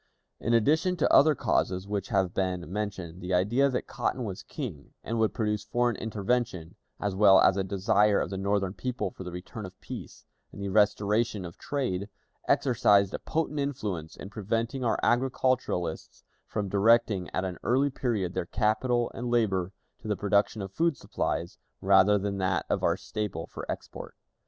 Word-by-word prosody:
In 115 +1 +1
addition 155 +10 +2
to - - +2
other 155 +1 +7
causes 95 -5 0
which 100 -1 -2
have 95 -5 +1
been 90 -2 -2
mentioned, 95 -4 -4
the 90 0 -1
idea 120 +10 +3
that 125 - -2
Cotton 125 - -2
was 100 -4 -5
king, 100 - -7
and 115 +1 -2
would 110 -3 +3
produce 105 -1 -1
foreign 120 +2 0
intervention, 110 -5 -2 0.3
as 105 -1 -1
well 95 -1 +6
as 95 - +5
a 100 - 0
desire 100 +2 +2
of - - -2
the 95 - -3
Northern 100 -1 0
people 125 +2 -3
for 95 - -9
the 90 - -6
return 90 +5 -7
of 95 -1 -10
peace - - -9 0.3
and - - -11
the 100 0 -3
restoration 105 0 +2
of 85 - -10
trade, 110 -9 -2 0.4
exercised 105 -6 +3
a - - -3
potent 155 -2 -2
influence 105 - -3
in 95 - -9
preventing 115 +4 -2
our 115 - +1
agriculturists 125 -8 0 0.2
from 105 -2 -2
directing 100 -1 +3
at 95 - -2
an 90 -3 -5
early 135 +4 +2
period 110 -9 -1
their 85 - -2
capital 120 +3 +1
and 120 +1 -4
labor 100 -6 +1 0.3
to 120 - -10
the 105 -2 0
production 100 +2 +1
of 95 - -7
food 165 +3 +1
supplies - - -3 0.2
rather 95 +1 +5
than 100 0 -2
that 95 -1 0
of - - +1
our - - +2
staple 105 -6 -4
for - - -6
export. - - -8
105 Hz, 175 wpm, -28 LUFS, 95-120 Hz, 0.4 s, other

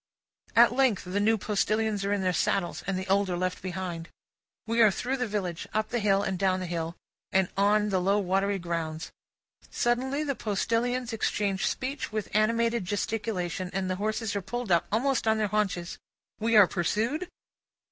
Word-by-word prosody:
At 235 0 +7
length 255 -6 +2
the 185 +3 -1
new 220 +2 +3
postilions 215 0 0
are 200 - -1
in 205 -2 0
their 185 -1 +1
saddles, 175 +1 0
and 195 -1 0
the 190 +1 -4
old 195 0 +2
are 175 - -1
left 185 0 -2
behind. 180 -3 -5 0.6
We 230 +1 +1
are 220 - +8
through 250 +7 -2
the 250 -2 -1
village, 190 -5 -3
up 215 0 0
the 240 - -1
hill, 200 -2 +2
and 190 -2 -2
down 190 -1 +2
the 185 - -4
hill, 165 -1 -3 0.4
and 190 -1 +2
on 210 +1 +3
the 190 -2 +1
low 195 +3 +2
watery 195 +1 +1
grounds. 165 -2 -4 0.6
Suddenly, 260 +5 0
the 285 -2 -1
postilions 235 +3 -1
exchange 205 -3 0
speech 265 0 -3
with 215 -1 -4
animated 230 +1 +2
gesticulation, 195 -3 -2
and 190 -1 -1
the 185 - -2
horses 215 +1 -2
are 200 - -1
pulled 240 +2 -4
up, 170 - +3
almost 245 +2 +1
on 220 0 +4
their 215 -2 0
haunches. 195 -5 -1 0.4
We 225 +1 +1
are 205 - +9
pursued? 220 - -1
205 Hz, 180 wpm, -28 LUFS, 185-225 Hz, 0.6 s, are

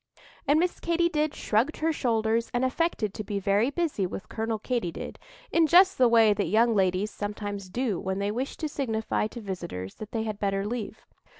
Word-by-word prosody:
And 290 +3 +5
Miss 355 +1 0
Katy 340 0 +1
did 305 -2 0
shrugged 230 +9 0
her 320 +1 +1
shoulders 230 -3 +1
and 245 +2 +2
affected 260 - 0
to 215 - -5
be 205 0 -3
very 200 +5 +2
busy 290 - -1
with 185 - -7
Colonel 225 0 -2
Katy 230 -5 -2
did, - - -7 0.3
in 330 -1 +4
just 370 +3 +6
the 250 - +7
way 225 -2 +6
that 205 -1 -1
young 225 +6 +4
ladies 190 +1 +1
sometimes 205 -2 -5
do 230 -2 -1
when 190 0 -2
they 200 +1 -1
wish 255 +5 -3
to 315 - -2
signify 225 -7 -1
to 235 - -9
visitors 175 - -5
that 215 0 -8
they 225 -1 -1
had 215 -2 -4
better 195 -1 0
leave. 225 0 -5
220 Hz, 200 wpm, -27 LUFS, 200-265 Hz, 0.3 s, the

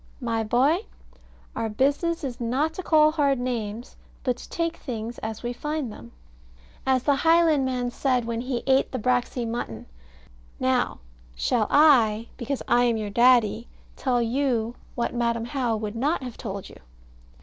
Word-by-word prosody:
My 230 -3 -1
boy, 275 - +2 0.7
our 225 -1 -2
business 285 +9 0
is 250 -3 -5
not 270 +7 0
to 370 - -5
call 310 -3 +4
hard 285 -3 +2
names, 235 -2 -4 0.3
but 250 -2 +1
to - - -12
take 335 0 -2
things 235 -1 -6
as 220 +1 -6
we 240 0 -2
find 295 -1 -3
them, 115 - -12 0.8
as 260 -2 +3
the 285 -2 +3
Highlandman 280 -7 +3
said 250 -2 0
when 230 0 -2
he 250 -1 -3
ate 270 0 +3
the 255 - -2
braxy 245 0 0
mutton. 225 - -4 0.7
Now - - 0 0.3
shall 210 - +1
I, 235 -7 +5
because 270 +2 -4
I 245 +1 +4
am 235 -2 +2
your 210 -2 -4
Daddy, 235 -1 +4 0.3
tell 245 -3 +1
you 235 -2 0 0.2
what 235 - -1
Madam 235 -1 0
How 240 -3 -1
would 215 0 -5
not 280 +5 0
have 245 -2 -6
told 200 -3 -6
you? - - -13
245 Hz, 160 wpm, -25 LUFS, 230-275 Hz, 0.8 s, I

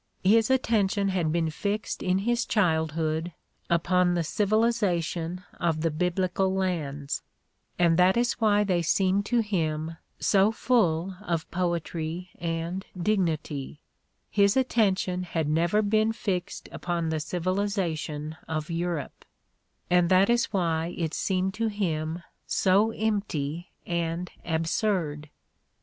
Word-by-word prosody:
His 220 +4 +4
attention 210 -6 +2
had 175 -5 0
been 165 -1 0
fixed 205 +7 -3
in 185 0 +1
his 240 0 +2
childhood 160 -3 0 0.4
upon 175 +1 +2
the 170 - +1
civilization 185 -4 0 0.2
of 165 -3 0
the 165 0 +1
Biblical 180 +3 0
lands, 155 -7 -2 0.6
and 170 -1 +3
that 185 +4 +5
is 240 0 0
why 210 -1 +4
they 185 -4 +1
seemed 190 +4 +2
to 240 -1 +3
him 160 -6 -2 0.2
so 200 +1 +3
full 190 -7 +1
of 170 -5 -3
poetry 170 0 -2
and 170 +2 -3 0.2
dignity; 160 -7 -1 0.5
his 200 +2 +3
attention 195 -8 +1
had 165 -4 -2
never 170 +7 +2
been 215 +2 +2
fixed 195 -4 -3
upon 170 -2 -2
the 160 -1 -1
civilization 170 -3 -2
of 160 +1 -3
Europe, 170 -4 -3 0.6
and 175 -1 +3
that 190 +4 +5
is 240 0 +3
why 170 -3 -1
it 165 -2 -2
seemed 190 0 0
to 225 +2 -1
him 170 -5 -2 0.2
so 200 +3 +3
empty 190 -8 -2 0.2
and 170 +1 -2
absurd. 160 -2 -1
180 Hz, 120 wpm, -27 LUFS, 165-200 Hz, 0.6 s, that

